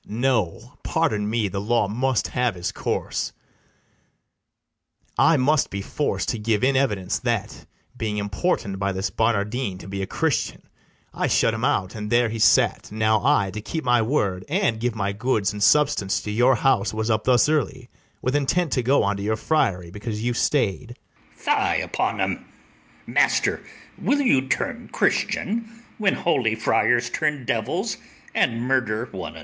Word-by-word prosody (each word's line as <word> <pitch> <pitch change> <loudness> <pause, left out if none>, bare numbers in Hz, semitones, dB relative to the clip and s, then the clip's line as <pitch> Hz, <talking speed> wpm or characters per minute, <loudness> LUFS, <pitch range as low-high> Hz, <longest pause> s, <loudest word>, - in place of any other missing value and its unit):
BARABAS. 110 - -7
No, 115 -2 0
pardon 110 -11 0
me; 110 -2 0
the 100 0 -4
law 110 0 +1
must 125 +4 0
have 125 -4 0
his 90 -1 -3
course: - - -2 1.8
I 160 -1 +4
must 140 +3 +2
be 100 0 -5
forc'd 150 - -2
to 115 - -2
give 105 0 0
in 135 +1 +3
evidence, 105 -8 0
That, 115 -5 -3 0.3
being 105 -2 -3
importun'd 100 - -1
by 100 0 -1
this 95 +2 -2
Barnardine 110 -1 0
To 90 - -11
be 100 0 -4
a 95 - -3
Christian, - - -1 0.5
I - - -1
shut - - +2
him - - -4
out, 95 -1 +1
And 105 -1 -5
there 120 0 +3
he 115 +1 -4
sate: 115 -2 +3
now 110 +1 +1
I, 120 -9 +3
to 105 +3 -6
keep 160 +9 -4
my 120 -2 +3
word, 100 -7 0
And 155 - +1
give 120 0 -1
my 100 -2 -1
goods 105 -2 0
and 105 - -6
substance 140 -6 +3
to 105 - -4
your 120 +5 +4
house, 110 -6 +1
Was 110 +1 -1
up 110 0 0
thus 125 0 +4
early, 135 -5 -1 0.4
with 130 +2 0
intent 150 +3 +1
to 125 - +1
go 130 +4 +3
Unto 100 0 -1
your 110 +2 -1
friary, 95 - 0
because 105 +2 -5
you 120 0 0
stay'd. 120 -1 0 0.4
ITHAMORE. - - +1
Fie - - +2
upon - - -2
'em! - - -2 0.6
master, - - +2 0.4
will 285 0 +1
you 135 - +3
turn 140 - -2
Christian, 230 +2 -1 0.2
when 200 -2 +2
holy 125 -10 +1
friars 120 +2 +2
turn 150 -4 -1
devils - - -1 0.4
and 115 0 +1
murder 120 -4 0
one 95 -2 -6
another? - - -9
115 Hz, 170 wpm, -23 LUFS, 105-130 Hz, 1.8 s, I